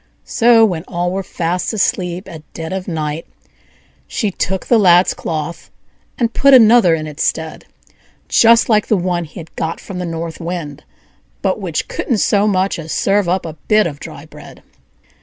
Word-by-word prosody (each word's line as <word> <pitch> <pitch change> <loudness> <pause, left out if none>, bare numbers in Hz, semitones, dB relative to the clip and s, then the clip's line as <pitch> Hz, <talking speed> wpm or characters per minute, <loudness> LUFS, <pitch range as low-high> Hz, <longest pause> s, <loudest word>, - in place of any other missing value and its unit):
So, 235 -2 +4
when 175 -6 -2
all 175 0 -2
were 195 +1 -2
fast 180 +2 -3
asleep 185 -3 -1
at 165 -4 -9
dead 160 +1 -6
of 190 -1 -4
night, 155 -2 -4 0.8
she 210 -5 -2
took 190 +1 -3
the 235 - +3
Lad's 180 -2 +5
cloth, 160 +1 -5 0.5
and 235 -2 0
put 275 -1 +5
another 225 -7 +6
in 155 -1 -5
its 150 -1 -7
stead, 160 -1 -3 0.6
just 230 0 +5
like 215 -2 +2
the 215 - +2
one 175 -1 -1
he 155 - -11
had 165 -1 -12
got 165 +1 -3
from 185 -2 -8
the 180 - -3
North 165 -1 -5
Wind, 165 -4 -5 0.6
but - - 0
which - - -3
couldn't 305 - -2
so 205 0 +2
much 190 -2 0
as 160 -1 -7
serve 200 -2 +1
up 185 0 0
a 160 - -6
bit 215 0 +4
of 145 -4 -5
dry - - -10
bread. - - -14
180 Hz, 175 wpm, -17 LUFS, 165-210 Hz, 0.8 s, another